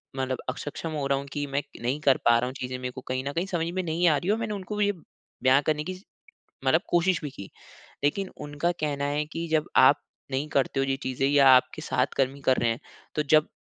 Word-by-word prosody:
मतलब 130 -1 -1
असक्षम 145 +5 -5
हो 150 -3 -2
रहा 140 0 +2
हूँ 140 - -7
कि 145 0 -2
मैं 140 +1 -1 0.2
नहीं 130 +5 -1
कर 140 -3 +4
पा 120 0 +6
रहा 125 - -1
हूँ 130 - -5
चीज़ें। 125 0 -4
मेरे 125 0 -4
को 130 - -9
कहीं 130 0 -2
न - - -1
कहीं 170 +3 -1
समझ 175 -4 -1
में 185 - 0
नहीं 170 +2 +1
आ 150 - +4
रहीं 185 +7 0
और 220 - +2
मैंने 225 -2 -3
उनको 200 +1 -5
भी 210 0 +2
ये 205 - +2 0.5
बयाँ 130 +2 +5
करने 150 -1 +1
की 185 - -4 0.7
मतलब 160 +6 +4
कोशिश 175 0 +2
भी 145 - -4
की। 100 -6 -10 0.5
लेकिन 185 +6 0
उनका 145 +3 -1
कहना 145 -2 -1
है 145 +1 0
कि 165 +1 -3
जब 155 -1 +1
आप 130 +2 +7 0.3
नहीं 135 +3 -2
करते 135 -1 +1
हो 135 - +1
ये 135 0 0
चीज़ें 130 +1 -1
या 140 -1 +6
आपके 125 - 0
साथ 130 +2 0
कर्मी 135 +1 0
कर 130 - +5
रहे 115 -1 +1
हैं 115 - -3 0.3
तो 150 - +1
जब 155 +1 +4
145 Hz, 245 wpm, -27 LUFS, 130-160 Hz, 0.7 s, आप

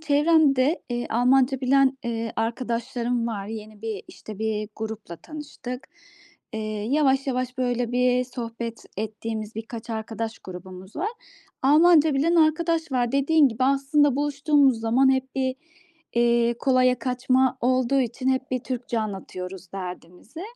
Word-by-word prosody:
çevremde, 295 -1 +3
eee, 240 0 -2
Almanca 255 +3 +3
bilen, 270 +1 +3
eee, 230 -1 -3
arkadaşlarım 235 +1 -1
var. 205 -4 -4
Yeni 215 -1 -8
bir, 220 -4 -4
işte, 215 -2 -10
bir 215 -1 -2
grupla 220 -6 -6
tanıştık. 280 - -8 0.6
Eee, 220 - -3 0.3
yavaş 275 -2 +2
yavaş, 255 -1 -2
böyle, 245 -1 0
bir 250 0 +2
sohbet 230 -2 -6
ettiğimiz 220 +1 -4
birkaç 225 +1 -7
arkadaş 225 0 -4
grubumuz 185 +1 -10
var. 365 +7 -1 0.5
Almanca 310 +1 +5
bilen 315 +5 +2
arkadaş 320 -1 +2
var. 245 -1 +1
Dediğin 280 +1 +4
gibi, 235 +2 -1
aslında 275 +1 +3
buluştuğumuz 285 -3 +2
zaman 260 +4 +4
hep 265 0 -2
bir, 260 -1 -1 0.6
iii, 235 0 +3
kolaya 255 -2 +3
kaçma 255 +1 +1
olduğu 255 +2 +2
için 255 +1 -2
hep 260 0 0
bir 255 - 0
Türkçe 245 -2 -3
anlatıyoruz 190 -3 -6
derdimizi 180 - -8
250 Hz, 130 wpm, -25 LUFS, 225-270 Hz, 0.6 s, Almanca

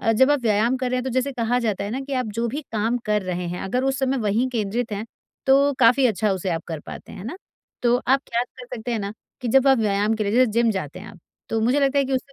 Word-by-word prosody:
अ, 225 - +2
जब 260 +5 +4
आप 290 -2 +3
व्यायाम 230 +2 +2
कर 255 -1 -2
रहे 255 - +1
हैं 250 - -1
तो 265 - -2
जैसे 260 +3 0
कहा 245 -1 0
जाता 215 -5 -1
है 200 - -4
ना 255 +4 -3
कि 275 +1 -7
आप 255 -2 0
जो 230 +2 0
भी 285 +6 -3
काम 225 +3 +1
कर 210 -1 +1
रहे 180 -1 -3
हैं 180 - -4
अगर 250 +7 -1
उस 270 0 0
समय 265 0 +1
वहीं 225 +3 +1
केंद्रित 225 0 -2
हैं 205 +1 -3 0.4
तो 275 +1 +5
काफ़ी 250 +2 +5
अच्छा 215 -2 +1
उसे 190 0 -2
आप 165 -1 -2
कर 160 -3 -5
पाते - - -10
हैं। - - -9
है 190 - -8
ना? 275 +11 -5 0.5
तो 240 0 +4
आप 265 +2 +2
क्या 235 +1 0
कर 250 0 -13
सकते 240 +2 -4
हैं 230 - 0
ना 200 0 -4 0.3
कि 245 - -3
जब 270 +3 +4
आप 265 -2 +5
व्यायाम 210 0 +1
के 215 -1 -2
लिए 200 - -1
जैसे 255 +3 +5
जिम 230 +1 +3
जाते 185 -5 -4
हैं 200 - -10
आप, 200 - -13 0.3
तो 225 - 0
मुझे 250 +6 +2
लगता 275 0 +2
है 275 - +3
कि 270 - -3
उससे 265 +2 -2
235 Hz, 295 wpm, -23 LUFS, 210-260 Hz, 0.5 s, तो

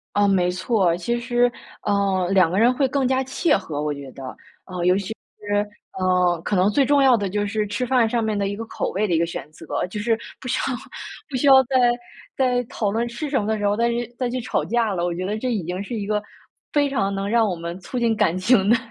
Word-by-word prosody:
啊， 205 0 +4
没 180 -2 +2
错。 185 -2 +1
其 235 +7 -2
实， 240 0 +2 0.3
呃， 195 -3 +1
两 185 -4 +5
个 190 - +1
人 235 +3 +5
会 270 +2 +1
更 265 0 0
加 260 +1 +1
契 295 +4 0
合， 160 -7 -4
我 150 0 -1
觉 140 -2 -9
得。 135 - -11 0.4
呃， 180 -2 -4
尤 180 +1 +5
其 195 -1 -2
是， 205 -1 -3 0.3
呃， 180 -2 +2
可 205 - -1
能 185 +2 +4
最 275 +6 +3
重 285 +1 +4
要 260 -3 +6
的 200 -2 -2
就 205 +2 -1
是 215 0 -1
吃 205 +4 -3
饭 245 -2 +3
上 230 0 0
面 215 -1 -1
的 200 -1 0
一 200 - -3
个 225 - -5
口 - - -3
味 210 +3 0
的 175 - 0
一 - - +3
个 170 - +2
选 165 -2 -7
择， 165 - -13 0.2
就 210 - -5
是 225 +1 +1 0.2
不 - - -8
需 250 - 0
要 260 - -1 0.5
不 275 - -6
需 255 +3 +1
要 265 -1 +8
在 260 +1 -3 0.6
在 250 -2 +2
讨 210 -2 -2
论 230 +3 -1
吃 240 +6 -5
什 275 -2 +1
么 205 - -4
的 220 0 0
时 205 - -2
候 205 0 +2
再 235 +2 +1
去 235 0 -2
再 250 -2 0
去 255 +1 -2
吵 235 - -1
架 230 -3 0
了。 175 -2 -2
我 175 0 0
觉 180 +1 -3
得 205 +3 -2
这 250 +3 -2
已 210 -6 -1
经 180 +4 -4
是 235 +4 -5
一 210 -2 -3
个 210 0 0 0.5
非 290 -1 +3
常 200 -8 -1
能 195 0 -2
让 225 0 +3
我 180 - -2
们 170 +1 -6
促 195 +7 -6
进 235 -2 +2
感 205 -5 +1
情 200 +1 +3
的 235 - +6
210 Hz, 280 characters per minute, -22 LUFS, 185-240 Hz, 0.6 s, 要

